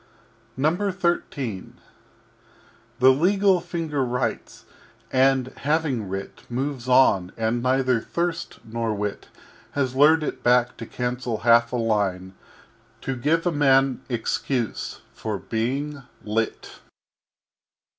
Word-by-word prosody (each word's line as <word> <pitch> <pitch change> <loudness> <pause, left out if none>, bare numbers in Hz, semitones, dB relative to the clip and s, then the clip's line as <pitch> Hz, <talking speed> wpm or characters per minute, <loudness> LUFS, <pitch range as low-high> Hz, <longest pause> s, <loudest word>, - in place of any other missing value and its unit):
XIII 165 - -1 1.2
The 130 +2 +7
legal 190 +6 +3
Finger 160 -6 -2
writes; 125 0 -3 0.5
and 130 -1 +2
having 145 - 0
writ, 95 +1 -6
Moves 130 0 -3
on 100 -8 +4
and 115 +1 0
neither 130 -2 +2
Thirst 170 +4 -3
nor 115 -1 -2
Wit 105 0 -4 0.5
Has 130 -3 0
lured 155 +4 +5
it - - -4
back 125 0 +3
to 115 - -7
cancel 125 -2 -3
half 115 0 +5
a - - -2
line 100 -5 -1 0.7
To 135 - -3
give 155 +7 +1
a 175 - +2
Man 135 -3 +3
excuse 120 0 -2
for 110 -2 -4
being 135 +8 -3 0.2
lit. 110 +1 -3
130 Hz, 105 wpm, -24 LUFS, 115-145 Hz, 1.2 s, The